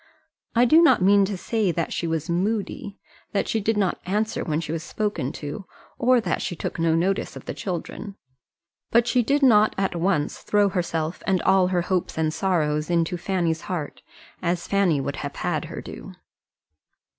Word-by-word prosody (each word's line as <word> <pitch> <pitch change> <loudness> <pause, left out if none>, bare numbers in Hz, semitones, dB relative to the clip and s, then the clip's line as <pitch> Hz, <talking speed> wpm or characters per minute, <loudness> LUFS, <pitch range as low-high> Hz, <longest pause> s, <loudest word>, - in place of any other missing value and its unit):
I 240 +2 +5
do 315 +7 +6
not 330 - +5
mean 200 +1 +5
to 195 0 -3
say 215 0 0
that 170 0 -2
she 170 - -2
was 160 -2 -2
moody, 200 +2 -2 0.4
that 200 - 0
she 225 - 0
did 215 +2 0
not 195 -3 0
answer 210 +3 -1
when 155 -2 -1
she 160 -2 -5
was 165 -1 -2
spoken 205 -6 -2
to, 150 +7 -6 0.3
or 250 +1 +4
that 225 - -1
she 175 - -3
took 165 - -5
no 165 -1 +2
notice 190 +4 0
of - - -10
the - - -4
children; 190 +2 -5 0.7
but 235 0 +4
she 250 0 +2
did 280 +5 +1
not 215 -4 +5
at 195 -2 0
once 170 -3 0
throw 205 -1 +2
herself 170 -3 -2
and 190 -1 +3
all 190 -1 +4
her 180 -2 0
hopes 180 -2 -1
and 155 -1 0
sorrows 155 -4 0
into 170 0 +1
Fanny's 175 -2 -1
heart, 165 -6 -4 0.4
as 175 -1 -1
Fanny 195 -7 +2
would 140 +1 -3
have - - -5
had - - -2
her - - -7
do. - - -9
185 Hz, 185 wpm, -24 LUFS, 165-205 Hz, 0.7 s, do